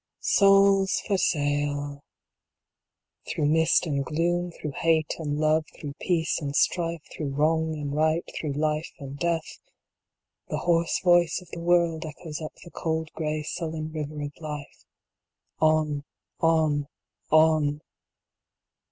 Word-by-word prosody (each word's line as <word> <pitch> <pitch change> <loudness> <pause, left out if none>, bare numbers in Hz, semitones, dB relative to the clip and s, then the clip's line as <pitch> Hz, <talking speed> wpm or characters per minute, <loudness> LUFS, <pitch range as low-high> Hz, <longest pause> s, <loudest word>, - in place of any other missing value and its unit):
souls 195 -1 +4
for 200 - +2
sale 145 -4 0
1 140 0 -11 1.3
Through 150 - -1
mist 160 +4 +3
and 140 -4 -1
gloom, 175 +4 0
Through 155 -3 -6
hate 160 -2 +2
and 145 -2 -2
love, 155 +1 +2
Through 145 -2 -7
peace 165 -3 0
and 140 -1 -3
strife, 170 -2 +1
Through 140 -3 -4
wrong 160 +2 +1
and 145 -2 -4
right, 155 +2 +1
Through 150 -3 -3
life 155 +2 -1
and 140 0 -8
death, 170 -2 -2 0.9
The - - -1
hoarse 170 -1 +1
voice 175 -2 +4
of 180 - -16
the 170 - -6
world 170 -2 +2
echoes 155 0 -7
up 155 - -6
the 170 - -12
cold 160 -1 -2
gray 155 -1 -2
sullen 155 0 -4
river 150 -1 -4
of 145 - -4
life. 150 -3 -7 0.7
On, 155 -2 +2 0.4
on, 155 -3 +2 0.4
on 155 -2 +4
155 Hz, 135 wpm, -26 LUFS, 150-165 Hz, 1.3 s, souls